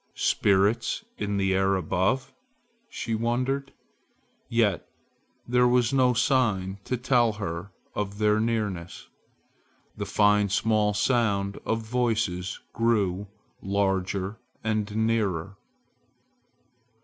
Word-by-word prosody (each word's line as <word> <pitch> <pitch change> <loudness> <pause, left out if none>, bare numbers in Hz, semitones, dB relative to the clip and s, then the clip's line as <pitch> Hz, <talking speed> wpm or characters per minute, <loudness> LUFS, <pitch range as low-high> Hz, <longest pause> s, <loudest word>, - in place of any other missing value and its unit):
"Spirits 105 - +2
in 100 0 -1
the 95 -1 +1
air 95 +1 +2
above?" 95 +9 0 0.6
she 115 - -4
wondered. 125 +5 -1 0.8
Yet 110 -8 +1 0.6
there 125 0 +4
was 125 0 +2
no 130 -2 +3
sign 105 -7 +1
to 125 - -1
tell 120 -2 +2
her 90 -3 -5 0.2
of 100 -1 -3
their 105 0 +3
nearness. 105 -6 -2 0.9
The - - -5
fine 105 0 +3
small 105 +1 +2
sound 100 -3 +1
of 110 0 -1
voices 110 -6 -1
grew 105 -4 +1 0.3
larger 95 0 -1 0.2
and 110 -1 0 0.2
nearer. 100 -5 -1
105 Hz, 100 wpm, -26 LUFS, 95-115 Hz, 0.9 s, there